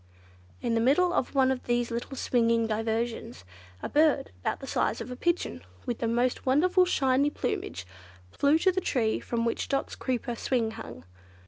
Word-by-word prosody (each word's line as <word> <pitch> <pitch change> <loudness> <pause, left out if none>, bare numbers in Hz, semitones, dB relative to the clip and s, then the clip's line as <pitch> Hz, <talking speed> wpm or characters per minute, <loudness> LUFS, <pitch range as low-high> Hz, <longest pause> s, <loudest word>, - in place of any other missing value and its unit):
In 235 - 0
the 230 - +2
middle 345 +9 +3
of 265 - -1
one 265 -1 +4
of 260 - -3
these 240 0 0
little 235 +3 -4
swinging 230 -2 +2
diversions, 225 - -2 0.4
a - - -1
bird 295 -2 +3
about - - -2
the - - -8
size - - 0
of - - -6
a - - -4
pigeon, 340 - -1 0.2
with 240 - -3
the 230 - 0
most 240 +2 0
wonderfully 360 +7 +3
shiny 270 -2 +3
plumage, 95 - -3 0.5
flew 285 - +3
to 375 +3 +3
the 375 +1 -1
tree 230 -9 0
from 235 -1 -2
which 230 - -1
Dot's 275 -1 -1
creeper 250 -1 -2
swing 230 -1 0
hung. 85 - -9
250 Hz, 180 wpm, -28 LUFS, 230-280 Hz, 0.5 s, one